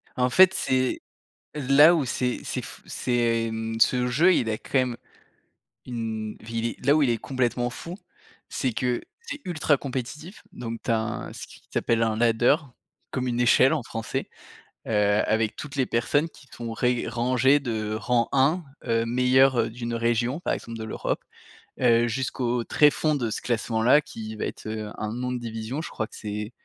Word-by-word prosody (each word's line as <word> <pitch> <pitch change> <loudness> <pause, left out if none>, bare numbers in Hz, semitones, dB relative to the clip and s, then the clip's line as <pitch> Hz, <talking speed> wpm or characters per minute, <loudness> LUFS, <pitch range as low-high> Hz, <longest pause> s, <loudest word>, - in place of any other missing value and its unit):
En 125 0 +2
fait, 185 +7 +6
c'est 130 -1 0 0.5
là 145 +4 +6
où 155 -5 +1
c'est 125 0 -1
c'est - - -3
f - - -11
c'est, 115 -2 0
mmh, 110 0 -4
ce 125 +1 +4
jeu 165 +9 +4
il 115 - +1
a 110 - -2
quand - - -16
même 125 -2 0 0.9
une 110 -3 -4
vili 115 +1 -3
là 140 +3 +5
où 155 - +3
il 130 - +3
est 115 - +1
complètement 125 -1 -1
fou, 170 +8 -8 0.5
c'est 130 -4 -1
que 125 0 -1 0.2
c'est 295 -11 -7
ultra 160 -4 +1
compétitif, 140 - -6
donc 115 -1 -6
tu 115 - -1
as 110 - +3
un 115 +2 -4
ce - - -8
qui - - -15
s'appelle 115 -1 +1
un 110 -1 +1
ladder, 120 +3 +4 0.6
comme 130 -1 -2
une 120 0 -1
échelle 130 +4 +5
en 145 -6 -1
français. 115 -1 -4 0.6
Heu, - - -3 0.3
avec 110 0 0
toutes 145 -2 -8
les 130 -2 +2
personnes 145 +7 +1
qui 140 - -18
sont 115 -1 -6
ré 125 +1 0
rangées 125 +4 +3
de 110 -5 -3
rang 115 +1 +1
1, 145 +6 +3 0.2
heu, 115 -1 +1
meilleur, 125 +2 +4
heu, 115 - +1
d'une 120 0 -5
région, 120 +5 0
par - - -1
exemple 115 -1 -6
de - - -4
l'Europe, 110 - -2 0.6
heu, 120 -1 +4
jusqu'au 120 0 -1
tréfond 150 +3 +3
de 120 -5 -1
ce - - -3
classement 115 -1 -1
là, 135 +5 +6
qui 110 -4 -8
va - - -3
être, - - -7
heu, 110 -1 -4
un 105 0 -3
nom 125 +1 -3
de 125 - -2
division, 115 +5 -4
je - - -6
crois 110 - -3
que - - -15
c'est 105 +1 -5
120 Hz, 185 wpm, -25 LUFS, 115-130 Hz, 0.9 s, fait